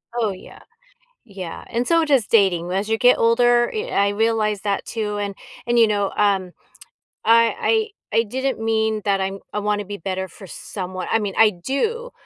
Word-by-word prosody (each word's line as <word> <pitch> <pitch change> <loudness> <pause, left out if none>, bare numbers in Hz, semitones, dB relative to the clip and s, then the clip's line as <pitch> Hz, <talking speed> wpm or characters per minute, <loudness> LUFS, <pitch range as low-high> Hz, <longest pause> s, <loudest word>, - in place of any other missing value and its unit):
Oh, 225 -4 0
yeah. 185 - -12 0.7
Yeah, 190 -6 -8
and 240 +1 -2
so 330 -1 +3
does 275 -8 +2
dating. 180 -5 +2
As 195 +3 -1
you 225 0 0
get 250 +1 +5
older, 240 +1 +3
y 440 +3 -3
I 200 - +2
realize 215 -1 0
that 200 -2 -1
too, 210 -2 -3
and 200 -1 -3 0.3
and, 240 0 +2
you 230 - +7
know, 205 -2 0
um, 195 -3 +1 0.7
I 230 - +3 0.2
I - - +3
I - - +3
didn't 260 +4 -2
mean 220 -1 0
that 200 -1 +2
I'm 195 +1 -3
I - - -1
wanna 210 0 -1
be 205 +1 -6
better 190 +1 -4
for 190 +2 -13
someone 185 +1 -6
I 225 - +3
mean, 205 -3 -4
I 220 -1 +7
do. 425 - -3
210 Hz, 185 wpm, -21 LUFS, 195-235 Hz, 0.7 s, you